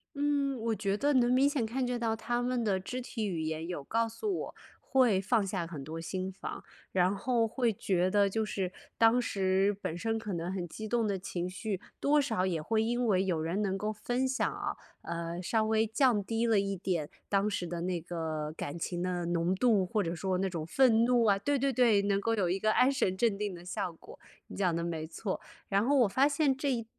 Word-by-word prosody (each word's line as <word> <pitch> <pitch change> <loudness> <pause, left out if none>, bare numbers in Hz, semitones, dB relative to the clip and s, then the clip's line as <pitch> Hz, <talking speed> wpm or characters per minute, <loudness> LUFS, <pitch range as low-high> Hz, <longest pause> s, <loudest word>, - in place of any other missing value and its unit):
嗯， 285 -1 +1
我 225 0 0
觉 200 -1 -1
得 285 +6 +1
能 245 -1 +4
明 275 +2 +5
显 270 -6 0
看 255 +4 -1
见 245 -1 -2
到 225 -1 0
他 240 +2 -2
们 245 -1 0
的 200 -3 +1
肢 250 +7 -5
体 225 -3 -3
语 170 -4 -2
言 160 +1 -3
有 175 -6 -4
告 230 +8 0
诉 230 - -3
我， - - -7 0.2
会 250 -8 +3
放 205 +1 +1
下 185 -3 -2
很 155 -5 -7
多 160 +3 -6
心 185 +3 -3
防。 190 - -7 0.3
然 185 +1 +2
后 235 +1 +1
会 235 -1 0
觉 185 -2 0
得 200 -1 +4
就 220 +2 -1
是 190 -3 -2 0.3
当 230 +2 +6
时 195 -2 +1
本 165 - -3
身 225 +4 -1
可 215 -2 -5
能 170 +2 -3
很 180 -2 -3
激 215 +6 -7
动 230 -1 +1
的 200 -2 0
情 180 -1 -4
绪， 195 0 -4 0.2
多 295 +1 +4
少 190 -9 0
也 170 -4 -1
会 220 +6 +1
因 240 +1 0
为 190 -3 +3
有 170 -4 0
人 175 +6 -1
能 190 -2 0
够 210 +2 -2
分 245 +4 -1
享 265 +1 0
啊， - - -4 0.2
呃， 170 +1 -4
稍 220 +4 +1
微 220 0 +2
降 225 -2 +2
低 225 +3 -1
了 220 -3 +4
一 195 0 -1
点， 175 -5 -2 0.2
当 200 +1 +2
时 190 -3 -2
的 170 0 -4
那 180 -1 -1
个 160 -2 -4
感 145 +4 -5
情 175 +1 -3
的 180 -1 -1
浓 175 +2 +1
度， 215 -3 +3
或 210 +3 0
者 165 -1 -2
说 185 +2 -1
那 195 - 0
种 170 -4 -4
愤 230 +3 +4
怒 245 -1 +3
啊。 200 -2 +4
对 285 +7 +1
对 275 0 +1
对， 225 -5 +4
能 200 0 +1
够 230 +1 +1
有 195 -4 +1
一 185 +3 0
个 215 +1 +2
安 255 +4 +4
神 190 -7 0
镇 230 -2 +2
定 200 -2 -3
的 175 +1 -12
效 180 - -3
果， 165 - -14 0.3
你 - - -8
讲 180 -4 +1
得 170 - -1
没 160 -2 -3
错。 190 +4 -4 0.3
然 200 +1 +2
后 285 +4 +2
我 245 -4 +5
发 265 +8 +3
现 280 -2 +2
这 275 0 -1
一 230 -2 -2
200 Hz, 250 characters per minute, -31 LUFS, 180-235 Hz, 0.3 s, 当